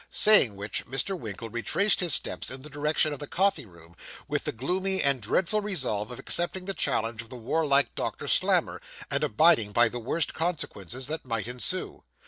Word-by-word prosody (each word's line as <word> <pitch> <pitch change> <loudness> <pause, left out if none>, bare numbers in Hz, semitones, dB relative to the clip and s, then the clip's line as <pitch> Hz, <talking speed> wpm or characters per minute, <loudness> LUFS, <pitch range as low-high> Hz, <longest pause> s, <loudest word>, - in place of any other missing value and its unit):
Saying 210 - +6
which, 100 +2 -5
Mr. 135 +10 -1
Winkle 115 - -7
retraced 160 - +1
his 175 -4 +3
steps - - -3
in 130 0 -1
the 150 - -11
direction 150 +1 0
of 145 - -7
the 145 - -7
coffee 190 - 0
room, 85 -2 -18 0.3
with - - -2
the - - -1
gloomy 185 - -1
and 140 -3 +2
dreadful 190 - 0
resolve 130 - -2
of 125 - -8
accepting 180 +2 0
the 195 - -3
challenge 115 - -1
of 115 - -14
the 125 - -8
warlike 140 +3 +1
Doctor - - -5
Slammer, - - +2 0.3
and - - +1
abiding 115 -5 +3
by 120 0 +4
the 120 - -6
worst 140 +7 -1
consequences 130 - -3
that 155 +4 -3
might 115 -4 -3
ensue. 125 +9 -3
135 Hz, 185 wpm, -27 LUFS, 115-175 Hz, 0.3 s, Saying